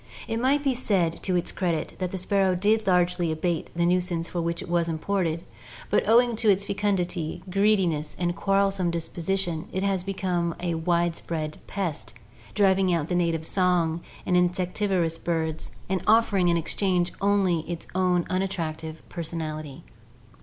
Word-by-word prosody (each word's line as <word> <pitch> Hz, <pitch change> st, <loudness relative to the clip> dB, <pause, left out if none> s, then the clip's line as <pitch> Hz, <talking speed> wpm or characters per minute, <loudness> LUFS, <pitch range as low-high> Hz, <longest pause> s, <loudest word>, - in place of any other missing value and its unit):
It 225 Hz, -, -2 dB
may 265 Hz, +4 st, +3 dB
be 280 Hz, -2 st, 0 dB
said 190 Hz, -9 st, 0 dB
to 185 Hz, -, 0 dB
its 175 Hz, -, 0 dB
credit 170 Hz, -4 st, -1 dB
that 185 Hz, -1 st, -1 dB
the 190 Hz, -, -3 dB
sparrow 190 Hz, 0 st, +2 dB
did 215 Hz, +4 st, +2 dB
largely 180 Hz, -2 st, +2 dB
abate 160 Hz, +1 st, -1 dB
the 170 Hz, 0 st, +2 dB
nuisance 175 Hz, -1 st, +1 dB
for 175 Hz, -, -3 dB
which 170 Hz, 0 st, -2 dB
it -, -, -10 dB
was 170 Hz, -1 st, +1 dB
imported, 170 Hz, 0 st, -1 dB, 0.5 s
but -, -, +2 dB
owing 240 Hz, +1 st, +5 dB
to 225 Hz, -1 st, +3 dB
its 200 Hz, 0 st, +3 dB
fecundity, 180 Hz, -5 st, -1 dB
greediness, 185 Hz, -7 st, +2 dB
and 175 Hz, -1 st, -1 dB
quarrelsome 195 Hz, -2 st, +1 dB
disposition, 170 Hz, 0 st, -2 dB
it 190 Hz, -, -2 dB
has 195 Hz, -2 st, +1 dB
become 180 Hz, -3 st, -1 dB
a 175 Hz, -1 st, -1 dB
widespread 165 Hz, -2 st, -1 dB
pest, 150 Hz, -, -3 dB, 0.4 s
driving 195 Hz, -2 st, +3 dB
out 165 Hz, -3 st, 0 dB
the -, -, -1 dB
native 165 Hz, -2 st, +1 dB
song 175 Hz, -3 st, +2 dB, 0.2 s
and 180 Hz, -, +1 dB
insectivorous 180 Hz, -1 st, +1 dB
birds 160 Hz, -2 st, -2 dB, 0.2 s
and 190 Hz, 0 st, -1 dB
offering 210 Hz, -4 st, +4 dB
in 170 Hz, -1 st, +3 dB
exchange 180 Hz, +1 st, 0 dB
only 195 Hz, -4 st, +3 dB
its 170 Hz, -1 st, -4 dB
own 180 Hz, -1 st, +2 dB
unattractive 165 Hz, -4 st, -3 dB
personality. 155 Hz, -4 st, -5 dB
180 Hz, 155 wpm, -26 LUFS, 165-195 Hz, 0.5 s, owing